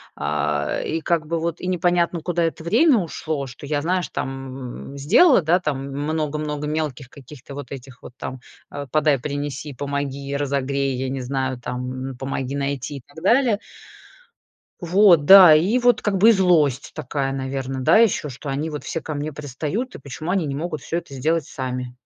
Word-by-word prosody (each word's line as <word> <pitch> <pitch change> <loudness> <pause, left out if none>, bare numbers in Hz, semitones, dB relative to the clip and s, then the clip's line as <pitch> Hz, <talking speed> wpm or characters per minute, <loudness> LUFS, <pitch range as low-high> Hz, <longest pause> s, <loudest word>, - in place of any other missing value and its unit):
а, - - -1
и 160 +1 -2
как 165 -1 0
бы 165 +2 -2
вот 170 0 -3
и - - -7
непонятно 175 -1 +1
куда 170 0 -1
это 165 0 -2
время 240 - +4
ушло, 155 -4 -4
что 125 +3 -10
я, 145 0 -1
знаешь, 180 +2 -1
там 135 0 -6
сделала, 220 - +5
да, 165 +3 +3
там 150 -6 -2
много-много 150 0 -2
мелких 150 -4 -3
каких-то 140 0 -12
вот 145 - -8
этих 130 -2 -10
вот - - -10
там, 130 - -6 0.3
э, 145 0 -5
"подай, 150 -2 +3
принеси, 145 +1 -4
помоги, 140 0 -4
разогрей", 140 -1 -1
я 130 +1 -3
не 135 0 -3
знаю 130 0 -2
там, 125 +2 -5
"помоги 135 0 -3
найти" 140 0 -1 0.2
и - - -10
так 160 +4 -13
далее. 235 -1 +3 1.2
Вот, 175 -3 +5
да, 185 -3 +10
и 200 +11 +3
вот 245 -2 +3
как 200 -2 +1
бы 220 +4 +7
и - - +9
злость 165 - +2
такая, 140 -3 -2
наверное, 135 0 -3
да 130 - +5
еще, 215 -9 +3
что 135 +3 -7
они 145 +4 -2
вот 150 -2 -6
все 165 - -4
ко 155 - -5
мне 145 +1 -4
пристают, 150 - -4
и - - -8
почему 140 +5 -7
они 185 -3 +1
не 140 - -3
могут 155 0 -4
всё 170 - -3
это 165 -5 -7
сделать 155 +3 0
сами. 125 -1 -5
145 Hz, 180 wpm, -22 LUFS, 135-170 Hz, 1.2 s, да